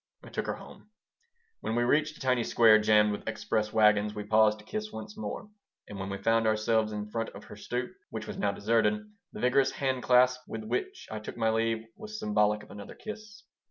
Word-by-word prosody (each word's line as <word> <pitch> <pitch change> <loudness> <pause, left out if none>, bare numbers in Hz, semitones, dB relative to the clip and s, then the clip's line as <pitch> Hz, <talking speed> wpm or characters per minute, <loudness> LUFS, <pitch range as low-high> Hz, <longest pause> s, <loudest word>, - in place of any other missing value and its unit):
I - - -11
took - - -3
her - - -1
home. - - -14 0.7
When 110 - -3
we 120 - +2
reached 155 +5 +2
a - - -17
tiny 125 -3 +1
square 110 -2 +6
jammed 105 0 +4
with 105 - -6
express 110 0 -1
wagons 105 -1 +3
we 105 - -4
paused 110 0 +4
to 105 - -16
kiss 215 - -4
once 110 -1 -8
more, 105 - -5 0.4
and 100 - -8
when 95 +1 -4
we 100 - -3
found 115 +1 +2
ourselves 110 0 +2
in 105 0 -5
front 115 0 -2
of - - -10
her - - -11
stoop, 125 +1 -4 0.2
which - - -5
was - - -6
now 100 - +1
deserted, 115 - +2 0.3
the - - -9
vigorous 130 +2 +3
hand 130 -2 -1
clasp 125 0 +4
with - - -5
which 380 - -3
I 110 - -4
took 105 - -8
my 110 -1 +2
leave 115 0 0
was 215 0 -8
symbolic 105 - +1
of - - -15
another 100 0 -9
kiss. 215 -1 -9
115 Hz, 215 wpm, -29 LUFS, 105-130 Hz, 0.7 s, square